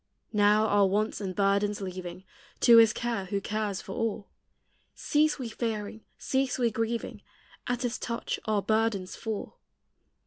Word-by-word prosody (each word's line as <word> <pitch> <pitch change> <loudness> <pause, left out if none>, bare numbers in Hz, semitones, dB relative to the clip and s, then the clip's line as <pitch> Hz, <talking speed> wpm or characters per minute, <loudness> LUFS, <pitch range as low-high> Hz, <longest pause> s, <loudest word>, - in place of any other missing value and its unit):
Now, 210 +1 +4
our 205 -2 +4
wants 210 +3 -1
and 185 -2 -4
burdens 200 +1 +1
leaving 185 -1 -6 0.4
To 235 -1 +8
his 225 -1 +7
care 230 -4 -3
who 200 +2 -2
cares 205 -1 -3
for - - -8
all, 215 -2 -3 0.7
Cease 305 +1 +2
we 255 -4 -4
fearing, 220 -1 -4 0.2
cease 265 -1 0
we 240 -2 +1
grieving; 225 +1 -3 0.5
At 245 +1 -1
his 245 -1 -2
touch 235 -1 -3
our 210 -2 0
burdens 215 -4 0
fall. 220 -2 -5
215 Hz, 145 wpm, -28 LUFS, 200-230 Hz, 0.7 s, To